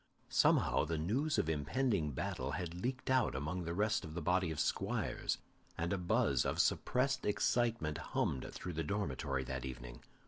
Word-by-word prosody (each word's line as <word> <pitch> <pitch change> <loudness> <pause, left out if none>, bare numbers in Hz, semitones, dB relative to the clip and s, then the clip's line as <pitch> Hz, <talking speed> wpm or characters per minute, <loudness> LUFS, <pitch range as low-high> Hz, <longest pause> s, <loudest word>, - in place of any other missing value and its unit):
Somehow - - +4
the 80 +1 -1
news 125 - 0
of - - +1
impending 80 - +1
battle 65 - -3
had 85 -2 -3
leaked 130 +2 -2
out 130 - +3
among 75 +6 -2
the 85 - -2
rest 105 +3 +1
of 80 0 -7
the 90 - -2
body 90 +1 +2
of 80 - -4
squires, - - 0 0.4
and 85 +2 0
a - - +1
buzz 90 - +2
of - - -1
suppressed 130 +2 +2
excitement 110 -7 +1
hummed 65 - -1
through 90 - -6
the 80 +1 -1
dormitory 70 -7 -1
that 65 0 -4
evening. - - -7
85 Hz, 170 wpm, -36 LUFS, 75-105 Hz, 0.4 s, Somehow